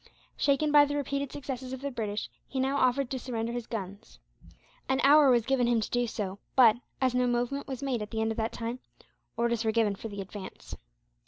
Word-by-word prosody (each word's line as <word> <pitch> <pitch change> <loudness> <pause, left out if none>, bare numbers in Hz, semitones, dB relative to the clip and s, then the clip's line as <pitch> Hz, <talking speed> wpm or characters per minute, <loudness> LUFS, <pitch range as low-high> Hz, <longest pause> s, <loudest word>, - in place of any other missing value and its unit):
Shaken 295 +1 +2
by 290 -1 +7
the 290 0 -3
repeated 280 -1 -2
successes 260 -2 -5
of 260 - -6
the 280 0 -3
British, 210 -4 -3 0.2
he 270 - -4
now 270 +2 +1
offered 255 0 +2
to 260 - -2
surrender 230 -2 -3
his 240 -1 -4
guns. 200 -2 -7 0.7
An 265 0 +2
hour 290 0 +7
was 240 -3 +4
given 260 -2 +2
him 240 -1 +3
to 215 - -3
do 245 0 +1
so 200 -3 -4 0.2
but, 240 -4 +7 0.2
as 255 -2 +2
no 250 0 +2
movement 245 +3 -1
was 265 -1 -5
made 255 -5 -1
at 210 - -5
the 220 - -3
end 220 0 +1
of 225 - -5
that 225 0 -1
time, 230 +2 -4 0.6
orders 235 -1 +1
were 220 - +2
given 220 -2 +2
for 200 - -7
the 200 -2 -7
advance. 190 0 -9
245 Hz, 220 wpm, -29 LUFS, 225-270 Hz, 0.7 s, by